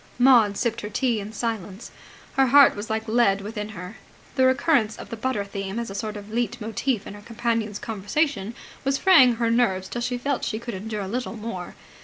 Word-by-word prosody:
Maud 240 Hz, -5 st, +5 dB
sipped 235 Hz, -1 st, -1 dB
her 210 Hz, -, -5 dB
tea 235 Hz, +1 st, 0 dB
in 205 Hz, +1 st, -6 dB
silence. 220 Hz, -2 st, -4 dB, 0.4 s
Her 270 Hz, -1 st, +3 dB
heart 280 Hz, +2 st, +7 dB
was 205 Hz, +2 st, -6 dB
like 220 Hz, +1 st, -2 dB
lead 215 Hz, -4 st, +3 dB
within 210 Hz, +1 st, -5 dB
her. 185 Hz, +1 st, -8 dB, 0.4 s
The 260 Hz, -1 st, +3 dB
recurrence 260 Hz, -4 st, +2 dB
of -, -, -10 dB
the -, -, -3 dB
butter 225 Hz, -3 st, -2 dB
theme 195 Hz, +1 st, -5 dB
as 235 Hz, -3 st, -3 dB
a -, -, -6 dB
sort 210 Hz, +1 st, -4 dB
of 205 Hz, +1 st, -10 dB
leit 240 Hz, +1 st, -1 dB
motif 225 Hz, +1 st, -2 dB
in -, -, -8 dB
her 205 Hz, -, -11 dB
companion's 230 Hz, -2 st, -2 dB
conversation 225 Hz, +1 st, -2 dB, 0.3 s
was 275 Hz, 0 st, +1 dB
fraying 275 Hz, -11 st, +6 dB
her 230 Hz, 0 st, 0 dB
nerves 190 Hz, -6 st, +1 dB
till 240 Hz, -, -4 dB
she 245 Hz, +1 st, -1 dB
felt 275 Hz, +1 st, -2 dB
she 215 Hz, -, -2 dB
could 235 Hz, +1 st, -6 dB
endure 205 Hz, +1 st, -4 dB
little 240 Hz, +3 st, -3 dB
more. 210 Hz, -5 st, -6 dB
225 Hz, 205 wpm, -24 LUFS, 205-245 Hz, 0.4 s, heart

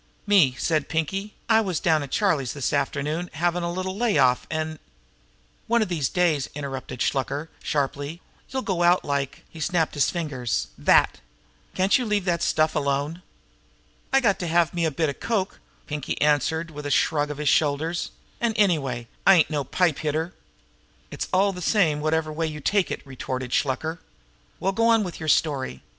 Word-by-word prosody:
"Me," 185 Hz, -11 st, +4 dB
said 155 Hz, -1 st, 0 dB
Pinkie, 195 Hz, +6 st, -2 dB
"I 225 Hz, -1 st, +5 dB
was 185 Hz, -7 st, -1 dB
down 160 Hz, -3 st, +2 dB
to 140 Hz, -, -4 dB
Charlie's 145 Hz, -, +1 dB
this 140 Hz, -4 st, -2 dB
afternoon 150 Hz, +4 st, -1 dB
havin' 175 Hz, +2 st, 0 dB
a 170 Hz, 0 st, -2 dB
little 185 Hz, +1 st, -3 dB
lay 225 Hz, -4 st, +1 dB
off, 125 Hz, -2 st, +3 dB
an' 155 Hz, -1 st, -3 dB, 0.4 s
" -, -, -37 dB
"One 235 Hz, 0 st, +3 dB
of 210 Hz, -, -5 dB
these 155 Hz, -7 st, 0 dB
days," 165 Hz, -6 st, +1 dB
interrupted 135 Hz, -3 st, -5 dB
Shluker 140 Hz, +3 st, -1 dB
sharply, 145 Hz, +2 st, -2 dB, 0.3 s
"you'll 265 Hz, 0 st, -3 dB
go 185 Hz, -4 st, -1 dB
out 175 Hz, +1 st, +4 dB
like" 140 Hz, -1 st, -2 dB
he 165 Hz, -, -13 dB
snapped 160 Hz, +1 st, 0 dB
his 145 Hz, -3 st, +2 dB
fingers 135 Hz, -, -2 dB
"that!" -, -, +3 dB, 0.6 s
"Can't 190 Hz, +7 st, +3 dB
you 250 Hz, -, -2 dB
leave 205 Hz, -3 st, 0 dB
the 175 Hz, -2 st, +1 dB
stuff 155 Hz, 0 st, +2 dB
alone?" 145 Hz, +4 st, -1 dB, 0.9 s
"I 270 Hz, 0 st, +4 dB
got 205 Hz, -6 st, +2 dB
to 175 Hz, -, -3 dB
have 170 Hz, 0 st, +2 dB
me 170 Hz, -2 st, +1 dB
bit 155 Hz, +1 st, 0 dB
of 140 Hz, -, -6 dB
coke," 205 Hz, -4 st, -1 dB, 0.3 s
Pinkie 150 Hz, -2 st, -4 dB
answered, 150 Hz, +3 st, +1 dB
with 150 Hz, -1 st, -6 dB
a -, -, -3 dB
shrug 145 Hz, +1 st, +2 dB
of 150 Hz, -, -5 dB
his 150 Hz, -1 st, +1 dB
shoulders. 160 Hz, +3 st, +1 dB, 0.3 s
"An', 235 Hz, -1 st, +1 dB
anyway, 155 Hz, -, +1 dB, 0.2 s
I'm 185 Hz, -5 st, +8 dB
no 150 Hz, -3 st, -1 dB
pipe 170 Hz, +2 st, +1 dB
hitter. 160 Hz, +3 st, -2 dB, 0.8 s
"It's -, -, -4 dB
all 195 Hz, +2 st, +3 dB
the 180 Hz, -, -7 dB
same 165 Hz, -6 st, +2 dB
whatever 155 Hz, 0 st, 0 dB
way 160 Hz, +1 st, -1 dB
you 150 Hz, -1 st, -6 dB
take 200 Hz, +5 st, +1 dB
it!" -, -, -5 dB
retorted 130 Hz, -1 st, -5 dB
Shluker. 160 Hz, +4 st, -1 dB, 0.6 s
"Well, 190 Hz, +3 st, +1 dB
go 230 Hz, +4 st, +2 dB
on 225 Hz, -2 st, +4 dB
with 180 Hz, -3 st, -6 dB
your 155 Hz, -1 st, -3 dB
story. 135 Hz, -, +1 dB
160 Hz, 180 wpm, -25 LUFS, 145-180 Hz, 0.9 s, I'm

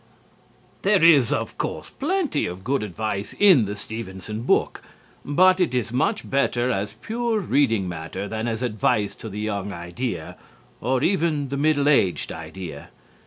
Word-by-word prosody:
There 195 Hz, -3 st, +3 dB
is, 145 Hz, -8 st, +6 dB
of -, -, -2 dB
course, -, -, -4 dB
plenty 320 Hz, -, -1 dB
of 90 Hz, +2 st, -7 dB
good 135 Hz, +4 st, 0 dB
advice 105 Hz, 0 st, -4 dB
in 185 Hz, -, +6 dB
the 100 Hz, +1 st, -4 dB
Stevenson 105 Hz, 0 st, -6 dB
book. 120 Hz, -, +1 dB, 0.4 s
But 185 Hz, +6 st, +4 dB
it 175 Hz, -8 st, +1 dB
is 120 Hz, -3 st, -1 dB
much 125 Hz, -, 0 dB
better 130 Hz, -2 st, +1 dB
as 100 Hz, -1 st, -2 dB
pure 230 Hz, -1 st, -1 dB
reading 130 Hz, -, +1 dB
matter 85 Hz, +3 st, -5 dB
than 110 Hz, +2 st, -3 dB
as 115 Hz, +1 st, -2 dB
advice 105 Hz, -3 st, +1 dB
to 110 Hz, -, -9 dB
the 105 Hz, +1 st, -6 dB
young 100 Hz, -2 st, -3 dB
idea 85 Hz, +8 st, -5 dB, 0.4 s
or 130 Hz, +1 st, 0 dB
even 160 Hz, -6 st, +1 dB
the 140 Hz, -, -3 dB
middle 145 Hz, -1 st, +2 dB
aged 100 Hz, -11 st, +2 dB
idea. 80 Hz, -2 st, -8 dB
115 Hz, 155 wpm, -24 LUFS, 100-145 Hz, 0.4 s, is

